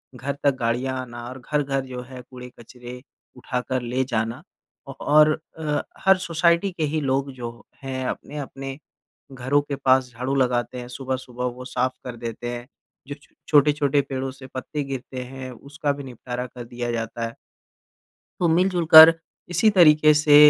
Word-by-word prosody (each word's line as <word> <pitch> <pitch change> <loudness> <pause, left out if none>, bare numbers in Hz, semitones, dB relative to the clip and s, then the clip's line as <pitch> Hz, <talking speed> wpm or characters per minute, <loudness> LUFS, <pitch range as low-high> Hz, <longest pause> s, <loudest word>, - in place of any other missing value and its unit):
घर 135 +3 -3
तक 140 -2 +3
गाड़ियाँ 125 +3 -1
आना 120 -1 -8
और 130 +1 -9
घर-घर 135 0 -1
जो 125 -1 -6
है 130 -1 -9
कूड़े-कचरे 125 0 -11 0.4
उठाकर 125 0 -2
ले 125 +2 -1
जाना। 115 -2 -2 0.5
ओ - - -4
और 155 +1 +4 0.2
अ, 150 -2 -1 0.2
हर 190 0 +6
सोसाइटी 170 +1 +2
के 175 -3 -4
ही 155 +1 0
लोग 135 0 0
जो 120 -2 -7 0.3
हैं 130 -1 -3
अपने-अपने 135 -2 -6 0.5
घरों 130 +2 +1
के 145 0 -5
पास 130 -1 +3
झाड़ू 125 +4 -3
लगाते 125 -1 0
हैं 120 - -7
सुबह-सुबह 130 -1 -4
वो 125 0 -9
साफ 130 0 0
कर 125 -1 -6
देते 115 0 -5
हैं। 120 0 -7 0.4
जो 145 - -5
छो - - -25
छोटे-छोटे 145 -1 +4
पेड़ों 135 -1 -4
से 130 0 -12
पत्ते 145 +3 -4
गिरते 130 -1 -6
हैं 130 0 -8
उसका 145 +5 -3
भी 140 0 -8
निपटारा 125 -1 -6
कर 125 -1 -9
दिया 120 0 -4
जाता 115 0 -3
है। 115 - -10 1.1
तो 175 - +3
मिल-जुल 175 +1 +2
कर 160 +1 +13 0.4
इसी 185 +5 +4
तरीके 155 -5 +6
से 150 -1 +5
130 Hz, 165 wpm, -23 LUFS, 125-145 Hz, 1.1 s, कर